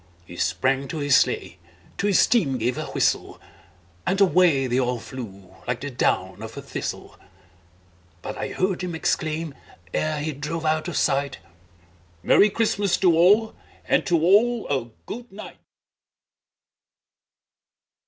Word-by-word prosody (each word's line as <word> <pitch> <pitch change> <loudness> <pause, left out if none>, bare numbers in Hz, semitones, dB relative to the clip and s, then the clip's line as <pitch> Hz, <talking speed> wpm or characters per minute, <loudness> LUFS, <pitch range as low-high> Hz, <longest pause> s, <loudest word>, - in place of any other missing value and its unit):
He 85 - -11
sprang 130 +11 0
to 160 - -5
his 145 -2 +3
sleigh, - - +1 0.4
to 200 - +1
his 200 - +5
team 155 - +1
gave 120 +2 -1
a - - -4
whistle, - - -1 0.6
And 190 +2 0
away 180 -8 +4
they 125 0 0
all 125 -1 0
flew 100 -7 -9
like 125 -1 -2
the 145 0 -5
down 125 - -1
of - - -8
a - - -5
thistle; - - -6 1.0
But - - -5
I - - -4
heard 185 0 -1
him 180 -2 -4
exclaim, 160 -1 -1 0.4
ere 155 -1 -1
he 155 +2 -2
drove 150 +3 -5
out 155 +1 +1
of 175 - -3
sight, 140 -1 0 0.9
"Merry 210 - +5
Christmas 205 -3 +1
to 175 -4 +4
all, 205 +7 +4 0.3
and - - +2
to 170 -2 +3
all 215 +8 +3
a 135 -4 -1 0.2
good 240 +2 -8
night!" 200 +2 -10
155 Hz, 145 wpm, -24 LUFS, 130-190 Hz, 1.0 s, his